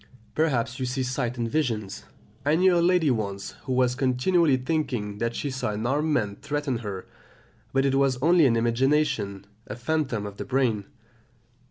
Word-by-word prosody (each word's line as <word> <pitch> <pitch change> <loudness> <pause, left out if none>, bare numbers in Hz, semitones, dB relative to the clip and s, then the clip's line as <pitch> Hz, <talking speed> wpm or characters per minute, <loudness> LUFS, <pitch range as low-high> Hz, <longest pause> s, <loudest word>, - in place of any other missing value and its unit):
Perhaps 130 -6 0
you 130 - -1
see 130 +1 -1
sights 125 -1 -2
and 120 -1 -1
visions; 115 -7 -2 0.4
I 145 +3 +3
knew 185 +1 +4
a 170 - +3
lady 170 -4 +3
once 100 -4 -3
who 130 - -1
was 125 -1 +2
continually 135 +4 +2
thinking 125 -8 -2
that 115 0 -1
she 145 - -3
saw 130 -5 -2
an 110 +2 -3
armed 150 +5 +1
man 105 -8 0
threaten 145 -4 -2
her, 100 -5 -6 0.7
but 135 0 +2
it 135 - +2
was 135 -2 +2
only 165 +1 +5
an 115 - +2
imagination, 115 -4 +1 0.2
a 105 - -5
phantom 125 -4 -1
of 100 -1 -8
the - - -5
brain. 125 -6 0
130 Hz, 175 wpm, -26 LUFS, 115-145 Hz, 0.7 s, only